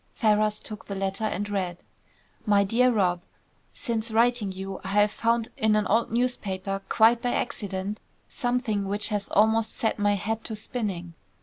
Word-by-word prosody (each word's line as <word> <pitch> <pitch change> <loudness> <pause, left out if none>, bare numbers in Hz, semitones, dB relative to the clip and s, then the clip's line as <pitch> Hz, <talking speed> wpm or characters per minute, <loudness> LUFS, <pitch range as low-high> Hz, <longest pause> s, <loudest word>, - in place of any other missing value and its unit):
Ferrars 215 -1 +2
took 215 -1 -9
the 200 - -4
letter 195 +2 -1
and 205 -1 -2
read: 185 -4 -3 0.6
"MY 205 -1 +5
DEAR 245 +5 +3
ROB., 180 -6 +1 0.5
Since 230 -3 -1
writing 230 -2 +2
you, 190 0 -6
I - - -6
have 205 +1 +3
found 230 +1 0
in 215 -1 +2
an 210 -1 +2
old 225 +3 +2
newspaper, 195 -5 -2
quite 230 +1 +5
by 245 -1 0
accident, 200 -2 -3 0.3
something 245 -5 -1
which 205 +3 +1
has 205 -2 -2
almost 220 +1 +2
set 220 -1 0
my 205 0 +3
head 220 +3 -3
to 220 - -4
spinning. 200 -6 -4
210 Hz, 165 wpm, -26 LUFS, 195-225 Hz, 0.6 s, MY